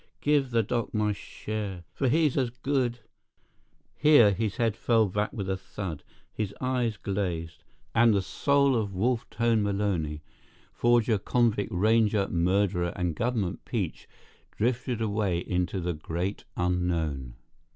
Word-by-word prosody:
Give 145 -3 +2
the 115 -2 +2
doc 115 +1 -2
my 105 -1 +1
share, 100 -3 -6
for 135 - 0
he's 155 0 +3
as 130 -4 +1
good—" 125 -1 -1 1.0
Here 145 -9 +6
his 105 0 -2
head 115 -4 +1
fell 115 -1 +3
back 105 +2 -1
with 100 -3 -4
a 95 - 0
thud, 95 -4 -6 0.3
his 105 -2 -3
eye 125 -2 0
glazed, 85 -5 -3 0.3
and 115 0 +5
the 100 -2 +2
soul 140 +4 +2
of 105 -4 -1
Wolf 115 +5 0
Tone 115 0 +1
Maloney, 95 -7 -1 0.5
forger, 120 -2 +3
convict, 110 -2 +1
ranger, 105 +1 +3
murderer, 90 0 +1
and 90 -2 -1
government 110 -3 -1
peach, - - -4 0.5
drifted 120 0 0
away 105 -4 0
into 90 +2 -1
the 90 0 -2
Great 85 +5 -4
Unknown. 85 -8 -1
105 Hz, 135 wpm, -28 LUFS, 90-120 Hz, 1.0 s, Here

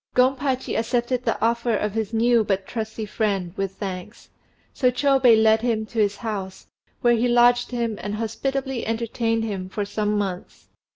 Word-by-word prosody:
Gompachi 260 +1 +1
accepted 245 +2 -1
the 225 - 0
offer 235 -1 +1
of 210 0 -1
his 220 -1 -2
new 230 0 +3
but 195 -2 -1
trusty 220 -1 -4
friend 200 -5 -1
with 195 -1 -3
thanks; 195 +1 -7 0.4
so 255 - +2
Chôbei 255 -3 +4
led 220 0 +4
him 225 -2 0
to 225 +1 -5
his 205 -1 +2
house, 200 -5 -5 0.4
where 240 -1 +4
he 235 +1 +2
lodged 245 0 +4
him 235 -3 -2
and 205 0 -3
hospitably 265 +3 -2
entertained 225 0 -1
him 195 -4 -4
for 205 +1 -3
some 210 +1 -1
months. 190 -3 -5
225 Hz, 165 wpm, -23 LUFS, 210-245 Hz, 0.4 s, Chôbei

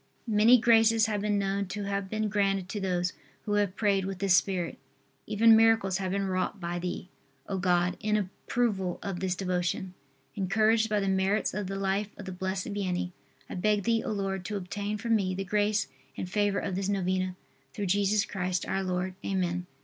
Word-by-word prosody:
Many 225 +2 +6
graces 225 -1 +5
have 210 -2 -1
been 210 0 +1
known 200 0 -1
to 205 +2 -4
have 200 -1 -2
been 215 +1 -1
granted 195 -2 +1
to 210 - -3
those 180 -2 -1 0.3
who 205 - -1
have 205 -2 +1
prayed 200 -3 +2
with 195 0 -4
this 195 -1 +3
spirit. 180 -6 0 0.5
Even 225 +2 +6
miracles 220 -4 +4
have 190 -1 -2
been 195 0 0
wrought 185 +1 -1
by 175 0 -3
Thee, 180 0 -4 0.4
O 195 -1 -2
God, 180 0 +2
in 215 0 +1
approval 195 -1 -1
of 195 -3 -3
this 185 -1 -1
devotion. 180 0 -2 0.4
Encouraged 220 +4 +2
by 210 -1 +2
the 195 - -1
merits 190 +2 +1
of 205 -1 -3
the 195 - -4
life 195 +1 0
of 205 - -8
the 190 - -5
Blessed 190 +1 -3
Vianney, 180 -3 -2 0.4
I - - -7
beg 210 +2 +1
Thee, 230 +1 +2
O - - -3
Lord, 195 -2 -2
to 210 0 -2
obtain 205 +3 -3
for 230 +3 -5
me 195 -5 +2
the 195 - -2
grace 205 +2 +1 0.3
and - - -3
favor 205 +1 +1
of 195 - -2
this 190 +1 -1
novena, 185 -1 0 0.4
through 200 +9 -4
Jesus 200 +2 +2
Christ, 185 -2 -2
our 195 - 0
Lord. 185 0 -2
Amen. 180 -2 -1
195 Hz, 195 wpm, -29 LUFS, 185-210 Hz, 0.5 s, Many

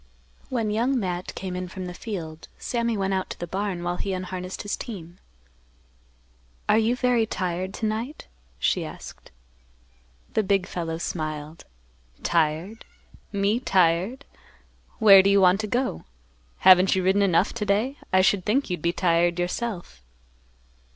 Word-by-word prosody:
When 225 -4 -1
Young 245 +5 +1
Matt 180 -3 -4
came 185 -1 -5
in 180 0 -4
from 185 +1 -7
the 180 - -6
field, 165 -7 -7
Sammy 235 -2 -1
went 195 0 0
out 190 -1 -2
to - - -7
the 175 - -3
barn, 190 0 -3
while 175 0 -2
he 195 - -3
unharnessed 185 0 -5
his 205 - -2
team. 180 -6 -8 1.5
"Are 220 - +4
you 225 +2 +2
very 245 -3 +2
tired 185 -1 -3
to 225 - -3
night?" 225 +7 -3 0.3
she - - +1
asked. - - -10 1.0
The - - +3
big 195 -2 +1
fellow 165 -3 -4
smiled, 155 -1 -5 0.6
"Tired? 165 +6 0 0.5
Me 200 +3 +1
tired? 190 +4 +1 0.7
Where 200 -4 +8
do 195 - +2
you 200 0 +5
want 185 +1 +5
to 215 - -2
go? 245 - -2 0.6
Haven't 185 0 +7
you 190 - 0
ridden 190 +2 +3
enough 190 0 +2
to 235 - -3
day? 225 +8 +1
I 185 - +5
should 190 0 +2
think 225 +2 0
you'd 175 - -3
be 170 - +1
tired 175 -1 +2
yourself." 175 - -4
190 Hz, 150 wpm, -25 LUFS, 175-215 Hz, 1.5 s, Where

